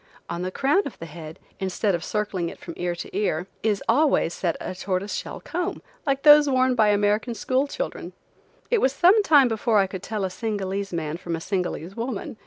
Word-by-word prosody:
On 170 +1 -3
the 185 - -2
crown 275 - +2
of 280 - -10
the 165 - -8
head, 160 -1 -9 0.2
instead 190 +2 0
of 170 -1 -2
circling 200 -5 -2
it - - -10
from 170 - -9
ear 175 0 -2
to 170 - -8
ear, 180 -4 0 0.2
is 210 -2 0
always 275 - +3
set 170 -3 -1
a - - -5
tortoise 185 +2 -3
shell - - -5
comb, 355 +3 -4 0.2
like 275 0 0
those 295 -1 +8
worn 255 -1 +3
by 220 -3 +3
American 210 +3 +1
school 255 +6 0
children. - - -5 0.6
It 470 - +3
was 265 - +3
some 370 +8 +5
time 290 -9 +6
before 225 -1 +1
I 195 - +5
could 190 -1 -7
tell 215 -2 -3
a 185 - -3
Singalese 200 -2 -3
man 160 -2 -3
from 170 -1 -4
a - - -5
Singalese 180 0 -3
woman. 230 -2 -4
205 Hz, 205 wpm, -24 LUFS, 180-260 Hz, 0.6 s, those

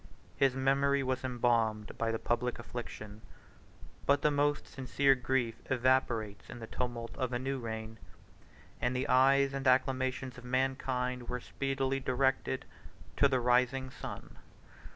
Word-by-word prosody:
His 135 -2 +3
memory 140 +1 +2
was 130 0 -1
embalmed 115 -4 +1
by 115 -1 +1
the 115 - -1
public 120 +2 -1
affliction; 110 -3 -7 0.9
but 140 0 +3
the 150 - +4
most 145 0 +1
sincere 135 +1 +2
grief 125 -3 -1
evaporates 120 -5 +1
in - - -7
the 115 - -7
tumult 120 0 -4
of 130 -1 -1
a 120 - 0
new 135 +2 -2
reign, 110 -1 -6 0.8
and 125 +1 0
the 130 +3 -1
eyes 135 +2 +4
and 135 -1 -2
acclamations 130 0 +1
of - - -14
mankind 125 -1 -1
were 125 - -2
speedily 135 +1 -1
directed 130 0 0 0.5
to 140 - +6
the 130 -2 +1
rising 125 +2 +2
sun. - - -8
130 Hz, 140 wpm, -32 LUFS, 120-135 Hz, 0.9 s, to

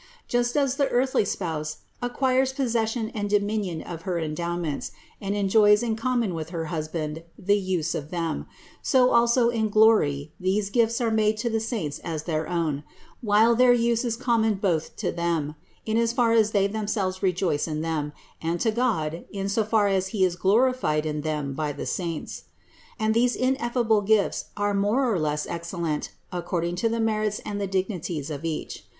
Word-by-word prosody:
Just 240 +2 0
as 275 -2 +1
the 280 - +2
earthly 255 -1 +2
spouse 155 -6 -3 0.2
acquires 260 +1 +1
possession 230 -3 0
and 205 -3 -3
dominion 205 -5 0
of 165 -1 -7
her 175 0 -2
endowments 165 -1 -3 0.3
and 200 0 -2
enjoys 210 +2 +4
in 225 -2 0
common 235 -3 0
with 160 -1 -5
her 165 -2 -3
hus 155 -1 -2
band 155 -1 -4 0.2
the 200 +1 +2
use 180 -4 -1
of 145 0 -4
them, 165 -2 -3 0.3
so 255 -3 +4
also 235 0 +4
in 220 -2 0
glory 180 -10 +3
these 195 +2 0
gifts 230 +1 +2
are 230 -2 +1
made 215 0 +2
to 235 +2 -1
the 225 - +1
saints 220 - -3
as 160 -2 -4
their 155 -2 -2
own, 160 -5 -1 0.4
while 220 +1 +4
their 250 +1 +6
use 235 0 +2
is 230 -2 -1
com 235 -2 +1
mon 220 -1 +2
both 180 -5 -1
to - - -2
them, 165 -3 -1 0.3
in 220 0 0
as 230 0 +2
far 240 -2 +3
as 220 -2 +4
they 200 -2 +2
themselves 200 -2 -2
rejoice 180 -5 +1
in 155 -1 -3
them, 155 -2 -2 0.3
and 165 +1 -1
to 225 - +2
God, 165 -9 -1
in 195 -1 -4
as 200 +1 -1
far 215 -2 +4
as 190 -1 +1
He 190 -1 +2
is 180 -1 0
glorified 200 -5 +2
in 150 -1 -2
them 150 -3 -2
by 150 +1 -2
the - - -6
saints. 170 -4 -4 0.5
And 220 -1 +1
these 240 +2 +3
ineffable 240 -4 +1
gifts 205 0 +2
are 205 0 +1
more 205 +7 +2
or 210 -7 +1
less 150 -1 -1
excellent 170 -2 -3 0.2
according 175 -1 -2
to 230 +5 +1
the 230 +1 -1
merits 215 -1 0
and 205 -1 -3
the 200 - -1
dignities 180 -6 -2
of 145 0 -5
each. 160 -2 -4
200 Hz, 185 wpm, -25 LUFS, 165-230 Hz, 0.5 s, their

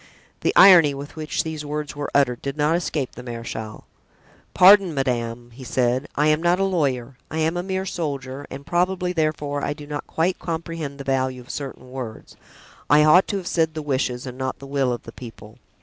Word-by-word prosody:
The - - +1
irony 170 -7 +8
with 140 +2 -8
which 155 -1 -2
these 160 -2 -5
words 150 0 -4
were 145 0 -4
uttered 125 -4 +2
did 140 +1 -4
not 150 +2 +2
escape 155 -6 -2
the - - -10
marechal. 115 -3 -7 0.7
"Pardon, 190 -2 +7
madame," 120 -3 -2
he 130 +3 -12
said, 125 +2 0
"I 150 - +2
am 155 +1 +3
not 175 +2 +2
a - - +2
lawyer, 135 -9 -1
I 160 - -5
am 160 +2 +1
a 175 - -1
mere 190 +1 -3
soldier, 140 -6 -4
and 140 +1 -8
probably, 180 +1 0
therefore, 150 -3 -1
I - - -1
do 145 0 -11
not 145 0 -6
quite 175 +3 0
comprehend 165 -4 -5
the 140 - -7
value 130 -1 -1
of 125 - -10
certain 130 -2 -7
words; 125 -4 -8 0.5
I 150 +1 +6
ought 155 +5 +6
to 200 - -1
have 190 - -6
said 160 -2 0
the 155 - -4
wishes, 130 -3 -1
and 125 0 -8
not 130 0 -3
the 140 - -11
will, 135 -2 0
of 120 - -4
the 115 - -10
people. 115 -3 -12
145 Hz, 205 wpm, -23 LUFS, 130-160 Hz, 0.7 s, irony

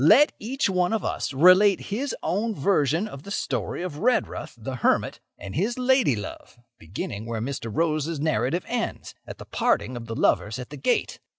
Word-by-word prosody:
Let 250 - +7
each 265 +6 -1
one 180 0 +1
of 220 - -1
us - - -2
relate 185 +7 +6
his 270 +6 -2
own 215 +4 -1
version 160 +2 +1
of 140 -10 -9
the 200 - -11
story 200 -3 -2
of 160 -5 -5
Redruth, 250 +3 0
the 130 +3 -5
hermit, - - +1 0.2
and 100 - -8
his 210 - -1
lady 255 - +3
love, 105 +3 -8 0.2
beginning 100 +5 -6
where 115 -1 -3
Mr. 120 0 -4
Rose's 155 +2 0
narrative 150 +2 0
ends—at - - -5
the - - -10
parting 110 +5 0
of 115 -1 -7
the 115 - -4
lovers 110 +1 +1
at 125 +2 -8
the 150 - -7
gate. 240 - 0
160 Hz, 180 wpm, -25 LUFS, 125-205 Hz, 0.2 s, Let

